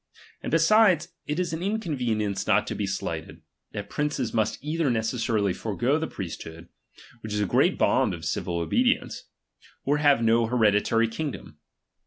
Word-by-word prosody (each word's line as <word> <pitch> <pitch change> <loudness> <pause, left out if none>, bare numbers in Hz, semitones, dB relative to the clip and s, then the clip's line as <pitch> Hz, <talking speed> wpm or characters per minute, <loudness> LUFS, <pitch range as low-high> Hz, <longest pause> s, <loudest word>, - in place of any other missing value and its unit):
And - - -4
besides, 170 0 +4 0.2
it 150 +3 -2
is 175 -3 -1
an 160 - -3
in 205 +4 -1
convenience 115 - -2
not - - +3
to - - -4
be - - -2
slighted, - - -5 0.3
that 100 0 -6
princes 145 -5 -2
must 110 -2 0
either 155 0 0
necessarily 110 -3 0
forego 120 - 0
the 160 - -2
priesthood, 85 -2 -8 0.5
which 110 -2 -6
is 105 - 0
a 105 - +1
great - - +2
bond - - +2
of - - -9
civil 85 -1 -2
obedience; 245 - 0 0.6
or 145 +1 +2
have 145 -5 +4
no 115 0 +3
here 110 -3 +3
ditary 115 +3 +2
kingdom. 140 +5 -6
120 Hz, 165 wpm, -26 LUFS, 105-160 Hz, 0.6 s, besides